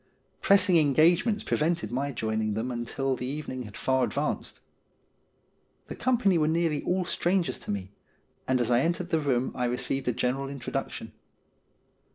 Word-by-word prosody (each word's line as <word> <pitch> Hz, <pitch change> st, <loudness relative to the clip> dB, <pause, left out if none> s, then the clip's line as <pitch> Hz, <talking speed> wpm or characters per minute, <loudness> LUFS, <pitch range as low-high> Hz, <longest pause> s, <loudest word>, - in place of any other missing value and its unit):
Press 200 Hz, -2 st, +5 dB
ing 180 Hz, -3 st, +5 dB
engagements 165 Hz, -, +3 dB
prevented 160 Hz, -7 st, 0 dB
my 140 Hz, +3 st, -1 dB
joining 110 Hz, -3 st, -1 dB
them 115 Hz, +4 st, -2 dB
until 125 Hz, +3 st, -2 dB
the 125 Hz, -, -5 dB
even 150 Hz, +1 st, -5 dB
ing 130 Hz, -1 st, -5 dB
had 105 Hz, -, -10 dB
far 130 Hz, -1 st, +1 dB
advanced. 145 Hz, +4 st, -2 dB, 1.3 s
The -, -, -5 dB
company 225 Hz, -9 st, +2 dB
were 155 Hz, -, +2 dB
nearly 160 Hz, -2 st, +1 dB
all 180 Hz, 0 st, 0 dB
strangers 175 Hz, 0 st, 0 dB
to -, -, -11 dB
me, 95 Hz, -2 st, -4 dB, 0.6 s
and 130 Hz, -1 st, +2 dB
as 120 Hz, 0 st, 0 dB
I 120 Hz, -, +5 dB
entered 170 Hz, +4 st, -1 dB
the 160 Hz, -, +3 dB
room 130 Hz, -4 st, 0 dB
I 125 Hz, -, -1 dB
received 125 Hz, +2 st, -1 dB
a -, -, +3 dB
general 130 Hz, +3 st, -1 dB
intro 140 Hz, -3 st, -7 dB
duction. -, -, -4 dB
140 Hz, 170 wpm, -27 LUFS, 125-170 Hz, 1.3 s, Press